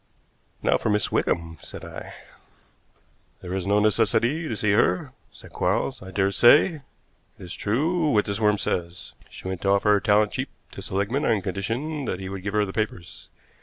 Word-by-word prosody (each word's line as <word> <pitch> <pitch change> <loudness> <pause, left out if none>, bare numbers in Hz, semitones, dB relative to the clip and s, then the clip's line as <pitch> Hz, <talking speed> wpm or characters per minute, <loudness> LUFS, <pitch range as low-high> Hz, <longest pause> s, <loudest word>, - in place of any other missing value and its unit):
"Now - - +3
for - - -1
Miss 105 -2 0
Wickham," 80 -2 -1
said - - -9
I. - - -9 1.3
"There 90 0 -5
is 95 -1 -3
no 100 +1 +3
necessity 115 - +2
to 115 - -3
see 105 -1 +1
her," 90 -3 +2 0.2
said - - -15
Quarles. - - -1
"I 95 - -9
dare 95 +1 +1
say 145 - +5
it - - -16 0.6
is 90 -1 -9
true 155 - 0
what 105 -6 +3
this 100 +1 -3
worm 105 -1 +3
says. 85 -2 -4 0.2
She - - -10
went 95 -2 -4
to 100 - 0
offer 100 +1 +3
her 105 - +4
talent 105 +1 +3
cheap - - -3 0.2
to - - -9
Seligmann 100 +9 -1
on 105 -4 +1
condition 120 - -3
that 90 - -3
he 95 -1 -6
would 95 -1 -6
give 100 +2 -4
her 105 -1 +3
the 95 - -7
papers. 95 -3 -4
105 Hz, 190 wpm, -25 LUFS, 95-115 Hz, 1.3 s, say